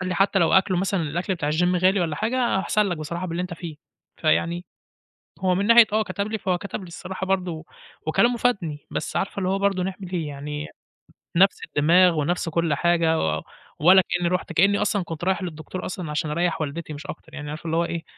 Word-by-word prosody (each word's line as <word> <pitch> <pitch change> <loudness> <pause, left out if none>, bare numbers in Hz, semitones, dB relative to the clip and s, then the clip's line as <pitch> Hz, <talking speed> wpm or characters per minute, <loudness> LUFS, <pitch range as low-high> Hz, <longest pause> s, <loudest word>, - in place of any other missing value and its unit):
قال 180 - -3
لي: 180 - -1
"حتى 195 +1 +3
لو 170 - +3
أكْلُه 190 -1 +4
مثلًا 190 -1 0
الأكْل 175 +5 -2
بتاع 150 -3 -2
الgym 180 +4 +2
غالي 190 +1 +4
والّا 160 -4 -1
حاجة 235 -1 +1
أحسن 210 +2 +1
لك 175 -3 -2
بصراحة 170 +4 -4
باللي 170 +1 -3
أنت 180 -1 -5
فيه". 165 -3 -8 0.4
فيعني 170 +2 +1 0.8
هو 185 -1 +2
من 200 +3 0
ناحية 230 -1 +8
آه 215 0 +3
كتب 200 -1 -3
لي 220 - -1
فهو 185 -2 0
كتب 200 - -6
لي 185 - -9
الصراحة 185 +2 -6
برضو 180 -4 -2 0.4
وكلامه 235 +9 +3
فادني، 180 -12 -1
بس - - -3
عارفة 195 - -2
اللي 185 -1 0
هو 195 +1 +1
برضو 195 -2 +1
نعمل 190 0 -5
إيه 165 -4 -2
يعني، 150 +1 -5 0.7
نَفس 195 +3 +4
الدماغ 170 +2 +4
ونَفس 175 +3 -1
كُلّ 165 -2 +1
حاجة 165 0 +2
و 80 -1 0 0.4
ولا 185 +5 +7
كأني 175 -1 0
رُحت، 180 -1 -2
كأني 195 +5 +4
أصلًا 205 -2 +1
كنت 165 0 -7
رايح 190 +1 0
للدكتور 160 +1 -6
أصلًا 175 -4 -5
عشان 150 +1 -1
أريّح 170 0 0
والدتي 155 +1 -4
مش 145 - -9
أكتر، 160 - -9
يعني 150 -1 -6
عارفة 155 +3 -7
اللي 165 0 0
هو 170 - +2
إيه 170 -1 -4
175 Hz, 215 wpm, -24 LUFS, 160-190 Hz, 0.8 s, ناحية